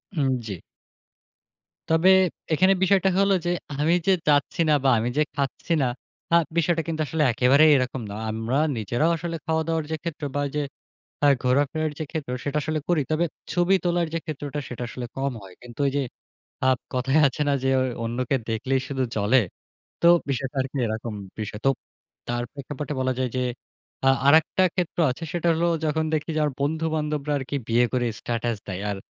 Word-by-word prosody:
হুম, 140 Hz, -4 st, +1 dB, 0.2 s
জি। 105 Hz, -, -4 dB, 1.4 s
তবে 165 Hz, +3 st, +4 dB, 0.4 s
এখানে 185 Hz, +5 st, +5 dB
বিষয়টা 190 Hz, 0 st, +4 dB
হলো 195 Hz, 0 st, +4 dB
যে, -, -, +1 dB, 0.3 s
আমি 155 Hz, +3 st, +3 dB
যে 195 Hz, -, +6 dB
চাচ্ছি 145 Hz, +2 st, +2 dB
না -, -, +5 dB
বা 135 Hz, -, +4 dB
আমি 115 Hz, +2 st, -1 dB
যে 150 Hz, -, +5 dB
খাচ্ছি 140 Hz, +3 st, -2 dB
না, 130 Hz, -, +2 dB, 0.5 s
আ -, -, +8 dB, 0.2 s
বিষয়টা 170 Hz, 0 st, +2 dB
কিন্তু 160 Hz, -1 st, -2 dB
আসলে 155 Hz, +3 st, 0 dB
একেবারেই 135 Hz, +6 st, +5 dB
এরকম 130 Hz, -1 st, -2 dB
না। 100 Hz, -, -5 dB, 0.2 s
আমরা 115 Hz, +4 st, -1 dB, 0.2 s
নিজেরাও 120 Hz, -, +1 dB
আসলে 165 Hz, +1 st, -4 dB
খাওয়া 160 Hz, 0 st, +1 dB
দাওয়ার 165 Hz, -1 st, 0 dB
যে -, -, +1 dB
ক্ষেত্রে 155 Hz, -3 st, -4 dB
বা 145 Hz, -, +1 dB
ওই -, -, -2 dB
যে 150 Hz, -, +1 dB, 0.6 s
আ -, -, +7 dB, 0.2 s
ঘোরা-ফেরার 145 Hz, +4 st, +1 dB
যে -, -, -1 dB
ক্ষেত্র, 155 Hz, -6 st, -4 dB
সেটা 145 Hz, +1 st, -1 dB
আসলে 155 Hz, -1 st, -1 dB
করি। 170 Hz, -4 st, +2 dB
তবে 160 Hz, +2 st, +2 dB, 0.3 s
ছবি 175 Hz, +2 st, +3 dB
তোলার 175 Hz, -1 st, +1 dB
যে 165 Hz, -, 0 dB
ক্ষেত্রটা, 145 Hz, -1 st, -4 dB
সেটা 125 Hz, 0 st, -5 dB
আসলে 125 Hz, +1 st, -6 dB
কম 135 Hz, -1 st, -1 dB
হয়। 95 Hz, -1 st, -12 dB
কিন্তু 120 Hz, 0 st, -13 dB
ওই -, -, +1 dB
যে, -, -, +2 dB, 0.6 s
আ -, -, +5 dB, 0.3 s
কথায় 135 Hz, +4 st, +2 dB
আছে 135 Hz, +2 st, -4 dB
না? 145 Hz, -, +3 dB
যে, -, -, +1 dB
অ -, -, +2 dB, 0.2 s
অন্যকে 120 Hz, +3 st, -1 dB
দেখলেই 130 Hz, +4 st, 0 dB
শুধু 130 Hz, -1 st, -1 dB
জ্বলে। 110 Hz, +4 st, +3 dB, 0.6 s
তো -, -, +3 dB, 0.2 s
বিষয়টা 135 Hz, +1 st, -3 dB
আরকি 135 Hz, +2 st, -7 dB
এরকম। 110 Hz, 0 st, -4 dB, 0.2 s
বিষয় 105 Hz, -1 st, -5 dB
তো -, -, +7 dB, 0.6 s
তার 120 Hz, 0 st, -1 dB
প্রেক্ষাপটে 145 Hz, +1 st, -5 dB
বলা 130 Hz, 0 st, +1 dB
যায় 130 Hz, -1 st, 0 dB
যে, -, -, +1 dB, 0.7 s
আ -, -, +7 dB, 0.2 s
আরেকটা 160 Hz, +5 st, +5 dB
ক্ষেত্র 180 Hz, -3 st, -2 dB
আছে, 130 Hz, +7 st, -6 dB
সেটা 175 Hz, -1 st, 0 dB
হলো 165 Hz, +2 st, +1 dB, 0.2 s
যখন 160 Hz, +1 st, +1 dB
দেখি 155 Hz, -1 st, -2 dB
যে, -, -, +2 dB
আমার 150 Hz, -2 st, +1 dB
বন্ধু-বান্ধবরা 150 Hz, -1 st, -1 dB
আরকি 135 Hz, +1 st, -4 dB
বিয়ে 120 Hz, +2 st, +4 dB
করে 125 Hz, -1 st, +1 dB
স্ট্যাটাস 120 Hz, -1 st, -2 dB
দেয় 95 Hz, 0 st, -4 dB
আর, 100 Hz, -, -3 dB
145 Hz, 185 wpm, -25 LUFS, 125-160 Hz, 1.4 s, আ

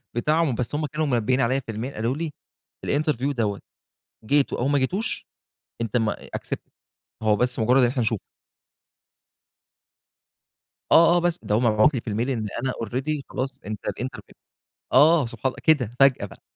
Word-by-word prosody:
بتاعهم. 150 Hz, +1 st, +1 dB
بس 125 Hz, +4 st, -3 dB
هُم 155 Hz, 0 st, -1 dB
كانوا 155 Hz, +1 st, -2 dB
منبهين 125 Hz, +1 st, +1 dB
عليَّ 130 Hz, +3 st, +1 dB
في 115 Hz, -, -7 dB
الmail، 120 Hz, +6 st, -5 dB
قالوا 115 Hz, +5 st, -1 dB
لي 165 Hz, -2 st, -3 dB, 0.6 s
الinterview 145 Hz, -2 st, 0 dB
دوّة، 105 Hz, -5 st, -2 dB, 0.6 s
جيته 140 Hz, +4 st, +2 dB
أو 130 Hz, -, 0 dB
ما 145 Hz, 0 st, +3 dB
جيتوش، 185 Hz, +12 st, -2 dB, 0.6 s
أنت 115 Hz, +1 st, -2 dB
م 110 Hz, -2 st, +1 dB
accepted، -, -, -7 dB, 0.5 s
هو 105 Hz, -1 st, +3 dB
بس 125 Hz, +2 st, 0 dB
مجرد 125 Hz, +4 st, +4 dB
إن 120 Hz, -, +5 dB
إحنا 125 Hz, 0 st, -2 dB
نشوفك. 110 Hz, -2 st, -1 dB, 2.7 s
آه 170 Hz, +1 st, +7 dB
آه، -, -, +4 dB
بس 175 Hz, 0 st, 0 dB
ده 105 Hz, -, 0 dB
هو -, -, +3 dB
مبعوت 115 Hz, +4 st, +4 dB
لي 120 Hz, -, -2 dB
في 115 Hz, -, -7 dB
الmail 115 Hz, +6 st, -1 dB
إن 110 Hz, -5 st, -2 dB, 0.2 s
أنا 130 Hz, -, 0 dB
already 135 Hz, +6 st, -2 dB
خلاص، 135 Hz, +1 st, -4 dB
أنت 105 Hz, 0 st, -6 dB
الinterview 130 Hz, +2 st, -5 dB, 0.6 s
آه، 150 Hz, 0 st, +6 dB
سبحان 125 Hz, -, -5 dB
الله، -, -, -17 dB
كده 125 Hz, -8 st, +2 dB
فجأة 135 Hz, -2 st, +4 dB
بقى. -, -, -16 dB
130 Hz, 165 wpm, -24 LUFS, 115-145 Hz, 2.7 s, آه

